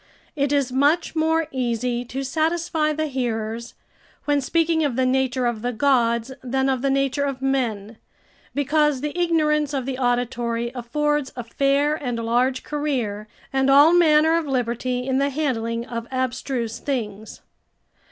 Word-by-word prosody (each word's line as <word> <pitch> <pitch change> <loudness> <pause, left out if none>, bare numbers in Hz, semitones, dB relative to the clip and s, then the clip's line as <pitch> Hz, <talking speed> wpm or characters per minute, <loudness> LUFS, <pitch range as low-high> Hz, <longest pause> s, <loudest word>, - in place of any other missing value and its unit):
] - - -33
it 280 -1 0
is 280 -3 +1
much 290 +7 +2
more 320 +1 +2
easy 245 -1 -1
to 260 +2 -5
satisfy 315 +2 0
the 310 +1 -1
hearers, 235 -4 -3 0.5
when 290 -1 +2
speaking 325 +3 +1
of 280 -5 0
the 260 0 +2
nature 260 -1 +1
of 235 -3 -1
the 245 +1 -1
gods 235 -1 +1
than 265 +1 0
of 260 -2 0
the 275 - +1
nature 275 +1 +1
of 275 -2 -2
men, 235 -6 -1 0.6
because 290 -1 +2
the 295 +2 -3
ignorance 305 -4 +1
of 265 -2 -2
the 265 -1 -4
auditory 240 -1 -1
affords 295 +3 -1
a 245 - -5
fair 275 +5 +1
and 250 -6 -3
large 245 +3 0
career 250 -9 -2 0.3
and 270 0 +2
all 290 +4 +7
manner 320 -2 +5
of 335 -2 -1
liberty 250 -1 -1
in 265 0 +1
the 280 +1 +2
handling 235 -5 -2
of 235 -1 -5
abstruse 255 -2 -2
things. 220 -6 -4
265 Hz, 155 wpm, -23 LUFS, 240-295 Hz, 0.6 s, all